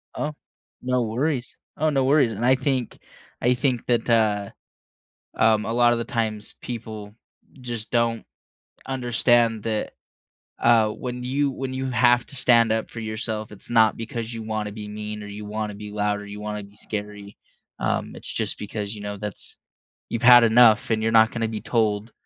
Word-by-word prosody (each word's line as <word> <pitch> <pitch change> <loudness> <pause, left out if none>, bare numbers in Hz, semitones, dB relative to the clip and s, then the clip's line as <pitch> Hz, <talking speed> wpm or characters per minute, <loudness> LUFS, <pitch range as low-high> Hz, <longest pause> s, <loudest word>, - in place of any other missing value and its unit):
Oh, 150 0 -3 0.5
no 125 0 0
worries. 125 +3 -2 0.2
Oh, 155 +1 +2
no 135 -3 +1
worries. 135 -4 +4
And 115 +4 -2
I 130 +1 +5
think 130 -4 -2 0.4
I 125 +1 +3
think 125 -2 -1
that, 120 -1 +1
uh, 105 -3 +2 0.8
um, 110 -1 +3
a 115 - -2
lot 120 0 +4
of 115 - -1
the 115 - -3
times, 110 -3 -3
people 110 -3 -7 0.5
just 120 -3 -6
don't 115 -1 +1 0.6
understand 120 -3 +2
that, 110 -2 -2 0.7
uh, 115 -2 +4
when 125 +3 -5
you 140 +3 0
when 130 0 -5
you 130 0 -3
have 120 0 +4
to 140 - -6
stand 115 -3 +4
up 110 0 -1
for 115 - -8
yourself, 110 -1 -4
it's 105 - -11
not 110 -2 +4
because 115 0 -5
you 115 -1 -6
wanna 110 -1 -3
be 105 0 -7
mean 105 0 -6
or - - -8
you 105 +1 -8
wanna 105 0 -4
be 105 0 -8
loud 105 0 0
or 105 - -9
you 100 +1 -8
wanna 105 0 -4
be 100 +1 -16
scary. 105 -1 -7 0.4
Um, - - -1
it's - - -7
just - - -2
because, 105 0 -5
you 105 - -9
know, 105 0 -5
that's 105 -2 -6 0.5
you've 115 - -3
had 120 0 +9
enough 115 0 +5
and 110 -1 +1
you're 115 - +1
not 110 0 +6
gonna 115 -1 -1
be 110 -2 -5
told 110 -2 0
115 Hz, 185 wpm, -24 LUFS, 105-120 Hz, 0.8 s, had